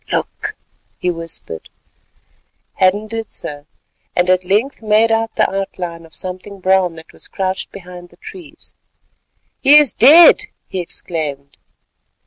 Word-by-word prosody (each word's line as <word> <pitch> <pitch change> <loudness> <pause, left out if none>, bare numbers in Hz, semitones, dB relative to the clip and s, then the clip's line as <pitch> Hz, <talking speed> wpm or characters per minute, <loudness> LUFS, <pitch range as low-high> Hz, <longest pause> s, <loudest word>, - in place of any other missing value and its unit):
"Look," 430 +1 -3 0.4
he 180 - -1
whispered. 165 - -6 1.1
Hadden 195 +3 +2
did 225 0 -5
so, 145 0 -7 0.5
and 180 +1 +3
at 185 0 +2
length 215 +10 0
made 220 +1 +3
out 225 0 0
the - - +3
outline 180 -4 -5
of 160 - -16
something 185 +2 -6
brown 185 -2 +2
that 160 0 -14
was - - -7
crouched 190 0 -3
behind 180 -2 -11
the - - -22
trees. 360 -8 -7 0.9
"He 285 +2 +7
is 295 -7 +5
dead," 315 +8 +8 0.2
he 190 - -4
exclaimed. 150 -5 -5
190 Hz, 130 wpm, -17 LUFS, 175-225 Hz, 1.1 s, dead